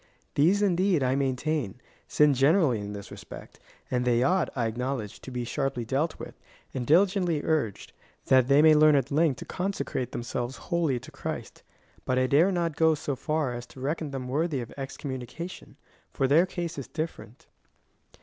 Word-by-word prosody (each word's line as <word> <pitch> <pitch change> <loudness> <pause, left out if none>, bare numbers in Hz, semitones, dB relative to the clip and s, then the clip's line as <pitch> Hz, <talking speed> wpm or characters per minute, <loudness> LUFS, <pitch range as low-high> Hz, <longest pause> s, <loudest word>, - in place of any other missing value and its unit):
These 185 +8 +3
indeed, 185 -4 +2
I 130 0 +2
maintain, 135 -3 -1 0.3
sin 150 -1 +4
generally 140 - +3
in 100 0 -6
this 100 -1 -9
respect, - - -11 0.3
and 125 -1 +1
they 120 0 +2
ought, 180 +5 +2
I 120 -3 0
acknowledge, 120 -1 -3
to - - -9
be 125 -1 -3
sharply 130 0 -2
dealt 140 +7 -1
with, - - -8 0.4
and 125 -2 -3
diligently 180 -2 +3
urged,^ 150 -11 -1 0.4
that 130 -2 +5
they 140 +2 +5
may 160 -1 +8
learn 155 0 +6
at 135 0 0
length 150 -3 +2
to - - -6
consecrate 180 -9 -3
themselves 120 +2 -4
wholly 165 -7 0
to - - -13
Christ; - - -6 0.4
but 130 - 0
I 130 - +3
dare 155 +9 +4
not 170 -4 -1
go 160 -1 +4
so 145 -1 -3
far 150 -1 -1
as 120 0 -7
to - - -14
reckon 150 +3 -2
them 135 -2 -5
worthy 150 +2 0
of 120 - -7
excommunication, 135 +4 -7 0.3
for 135 - 0
their 160 +7 +5
case 170 -4 -4
is 135 - -7
different. 155 -7 -6
140 Hz, 175 wpm, -27 LUFS, 125-160 Hz, 0.4 s, may